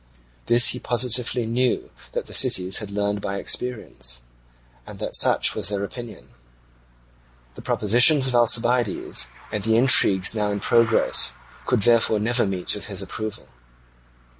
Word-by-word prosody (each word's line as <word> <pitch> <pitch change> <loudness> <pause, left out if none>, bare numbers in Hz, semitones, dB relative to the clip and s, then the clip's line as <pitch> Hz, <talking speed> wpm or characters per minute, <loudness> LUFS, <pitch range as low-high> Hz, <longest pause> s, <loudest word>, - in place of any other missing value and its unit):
This 120 +1 +4
he 125 - -2
positively 125 0 0
knew 125 +2 -2 0.2
that - - -4
the - - -13
cities 95 +1 +2
had 105 -3 -8
learned 100 0 -3
by 100 0 -5
experience, - - -2 0.6
and - - -11
that - - -4
such - - +4
was - - +2
their 100 -1 -2
opinion. 115 0 -10 1.2
The - - -12
propositions 125 +7 +2
of 130 - 0
Alcibiades, 120 -1 +1 0.2
and 105 -2 -4
the 110 +1 +1
intrigues 110 -7 +3
now 105 -2 -2
in 100 0 -3
progress, 115 +2 +2 0.3
could 105 - 0
therefore 115 -1 +3
never 120 +1 0
meet 95 -2 -3
with 105 - -6
his 100 -2 -4
approval. 110 +2 -6
110 Hz, 140 wpm, -22 LUFS, 100-120 Hz, 1.2 s, This